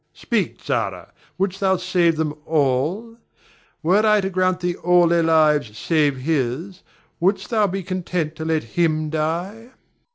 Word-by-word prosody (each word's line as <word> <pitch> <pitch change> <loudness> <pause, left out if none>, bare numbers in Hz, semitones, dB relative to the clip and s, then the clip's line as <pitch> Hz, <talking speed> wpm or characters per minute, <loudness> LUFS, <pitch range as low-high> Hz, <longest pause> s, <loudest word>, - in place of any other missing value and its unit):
Speak, - - -2
Zara! - - -2 0.3
wouldst 195 +1 -1
thou 190 -1 +2
save 180 -2 +1
them 155 -1 -1
all? 160 - 0 0.7
Were 190 +6 +3
I 215 -1 +4
to 190 0 -3
grant 185 0 0
thee 175 -1 -1
all 175 0 +4
their 170 0 +3
lives 150 -8 +2
save 150 -4 +1
his, 155 +6 -2 0.4
wouldst 195 +7 0
thou 215 -3 +3
be 195 0 -4
content 180 -3 -3
to 160 - -5
let 160 -1 0
him 155 +4 -1
die? 175 +9 -3
170 Hz, 150 wpm, -21 LUFS, 155-190 Hz, 0.7 s, I